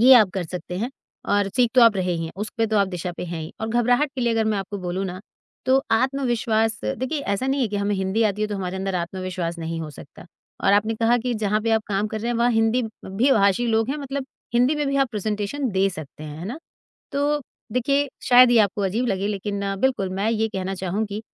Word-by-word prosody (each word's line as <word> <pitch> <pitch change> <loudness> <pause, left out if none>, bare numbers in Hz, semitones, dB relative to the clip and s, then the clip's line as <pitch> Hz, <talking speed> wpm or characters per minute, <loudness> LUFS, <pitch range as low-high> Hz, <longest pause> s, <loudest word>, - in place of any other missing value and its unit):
ये 260 +3 +9
आप 215 -6 +6
कर 190 -2 -1
सकते 180 +1 -6
हैं 235 +5 -2 0.4
और 205 -1 +2
सीख 245 -2 +4
तो 255 - +7
आप 230 -3 +6
रहे 185 -1 0
ही 165 -1 -2
हैं, 160 - -6
उस 210 +2 -4
पे 225 - +3
तो 220 0 0
आप 200 -1 +3
दिशा 180 -1 -4
पे - - -4
हैं 170 -1 -5
ही 155 - -8
और 220 - -2
घबराहट 245 +5 +2
के 260 - -3
लिए 240 -1 +2
अगर 225 -1 +1
मैं 215 -2 +1
आपको 195 +1 -5
बोलूँ 180 +1 -3
ना, 185 -1 -5 0.5
तो 265 +1 +4
आत्मविश्वास 225 -3 +1
देखिए 260 +5 -2
ऐसा 200 0 -1
नहीं 270 +1 +1
है 235 - +1
कि 205 - -3
हमें 200 0 0
हिंदी 190 +3 0
आती 210 -1 +1
है 215 - 0
तो 205 - -3
हमारे 185 -1 -3
अंदर 190 0 -2
आत्मविश्वास 180 -1 -3
नहीं 165 0 -4
हो 155 -1 -5
सकता 145 +3 -13 0.4
और - - +5
आपने 215 +2 +3
कहा 230 +2 +3
कि 245 +1 -2
जहाँ 215 -1 0
पे 225 - -1
आप 220 -1 +3
काम 200 +1 0
कर 215 0 -4
रहे 235 +2 -2
हैं, 240 - 0
वहाँ 240 +1 +3
हिंदी 225 +2 +2 0.2
भी 220 +9 +1
भाषी 200 0 +3
लोग 225 0 +1
हैं। 290 - -1
मतलब 275 -1 -4 0.3
हिंदी 250 +5 +4
में 295 -1 0
भी 275 - 0
आप 275 -1 +3
प्रेज़ेंटेशन 215 +6 -2
दे 195 0 +2
सकते 155 -3 -9
हैं, 150 0 -8
है 170 - -6
ना? 245 +9 -5 0.5
तो 290 +1 +1 0.3
देखिए, 275 +3 +2 0.2
शायद 250 0 +7
ये 240 - +5
आपको 205 0 +1
अजीब 210 +6 0
लगे 195 -3 0
लेकिन 200 0 -3 0.2
बिल्कुल 250 -7 +1
मैं 200 +3 0
ये 220 0 +1
कहना 190 -2 -3
चाहूँगी, 200 +3 -3
215 Hz, 245 wpm, -23 LUFS, 190-240 Hz, 0.5 s, ये